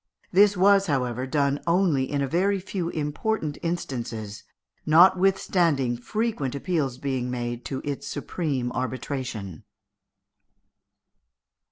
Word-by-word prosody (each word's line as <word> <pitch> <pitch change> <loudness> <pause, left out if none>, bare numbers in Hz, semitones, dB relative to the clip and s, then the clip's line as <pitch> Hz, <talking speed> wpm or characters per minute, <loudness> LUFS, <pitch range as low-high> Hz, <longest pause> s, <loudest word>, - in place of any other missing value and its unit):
This 200 +1 +5
was, 195 +1 +5
however, 130 -3 -1
done 140 0 +1
only 170 -7 +2
in 140 -1 0
a - - -1 0.3
few 180 -2 -3
very 175 - -7
important 150 +1 -2
instances, 115 -11 -4 0.4
notwithstanding 175 -5 +4
frequent 150 - -2
appeals 140 -5 -1
being 130 -2 -2
made 120 -1 -4
to 135 - -4
its 145 -1 -4
supreme 140 -4 -2
arbitration. 125 - -4
140 Hz, 100 wpm, -25 LUFS, 125-175 Hz, 0.4 s, This